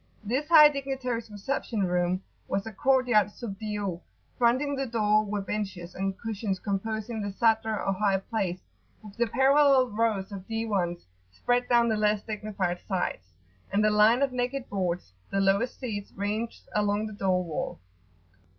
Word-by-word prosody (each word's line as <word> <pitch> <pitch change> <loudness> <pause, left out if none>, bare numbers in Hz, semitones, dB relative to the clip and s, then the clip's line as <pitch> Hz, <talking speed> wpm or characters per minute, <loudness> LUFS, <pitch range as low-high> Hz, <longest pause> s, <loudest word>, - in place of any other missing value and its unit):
This 255 +8 -1
high 305 -3 +9
dignitary's 265 -5 -3
reception 210 0 -2
room 180 +1 0 0.2
was 195 +1 -1
a 225 - -7
court 260 +3 +2
yard 210 -4 +4
sub 205 -2 -8
dio: 205 -5 -3 0.3
fronting 255 +4 +2
the 270 -1 -2
door 215 -2 +2
were 205 -1 -3
benches 195 -4 -4
and 195 0 -2
cushions 215 -3 -3
composing 220 +3 -3
the 205 -1 -3
Sadr 220 0 +2
or 195 - 0
high 195 0 +2
place, 195 -3 -3 0.4
with 205 -2 -12
the 235 0 +1
parallel 270 +1 +4
rows 210 -2 0
of 195 -2 -8
Diwans 200 -6 -2 0.3
spread 245 - 0
down 235 -1 +4
the 220 -2 +1
less 210 -1 +1
dignified 205 -5 -3
sides, 180 - -2 0.4
and 205 +2 +2
a 215 - +4
line 215 +5 +5
of 275 - +1
naked 250 +1 -2
boards, 180 - -2 0.2
the 195 - 0
lowest 195 +5 +1
seats, 210 -6 -5
ranged 210 +3 -3
along 210 0 +1
the 215 - -6
door 185 -3 +1
wall. 165 -3 -4
210 Hz, 160 wpm, -28 LUFS, 195-235 Hz, 0.4 s, high